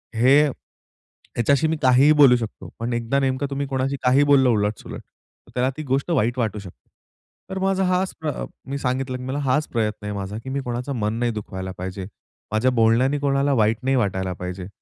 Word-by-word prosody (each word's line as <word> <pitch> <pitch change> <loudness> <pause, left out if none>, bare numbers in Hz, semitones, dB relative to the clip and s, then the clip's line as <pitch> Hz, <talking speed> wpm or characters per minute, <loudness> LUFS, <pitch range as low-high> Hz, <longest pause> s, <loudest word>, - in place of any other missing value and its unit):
हे 130 +6 +5
ह्याच्याशी 140 +1 -3
मी 160 0 -1
काहीही 130 +3 +5
बोलू 125 -3 +8
शकतो. 115 -2 -7
पण 115 +1 -2
एकदा 120 +3 0
नेमकं 135 +1 0
तुम्ही 140 0 -3
कोणाशी 135 +1 -1
काहीही 130 +3 +4
बोललं, 135 -3 +5
उलट-सुलट, 105 -2 -2
तर - - -28
त्याला 125 +1 +2
ती 155 - -4
गोष्ट 135 +5 -1
वाईट 120 -4 +1
वाटू 110 -3 -1
शकते. 95 -3 -14 0.6
तर 190 0 -4
माझा 190 0 +1
हाच 185 +1 0
प्र 155 - -1
अ, 145 - -4 0.2
मी 140 - -2
सांगितलं, 130 -1 -2
की 125 - -9
मला 130 +3 -3
हाच 145 +2 +1
प्रयत्न 110 -3 -2
आहे 105 - -3
माझा 100 +1 -5
की 130 - -7
मी 140 +1 -2
कोणाचा 125 +2 -3
मन 105 -3 -1
नाही 120 -1 +1
दुखवायला 95 -3 -6
पाहिजे. 95 +1 -5 0.5
माझ्या 110 +4 +2
बोलण्याने 125 +6 +3
कोणाला 140 0 +1
वाईट 110 -2 +2
नाही 135 +1 +2
वाटायला 95 -6 0
पाहिजे. 90 0 -6
125 Hz, 195 wpm, -22 LUFS, 110-140 Hz, 0.6 s, बोलू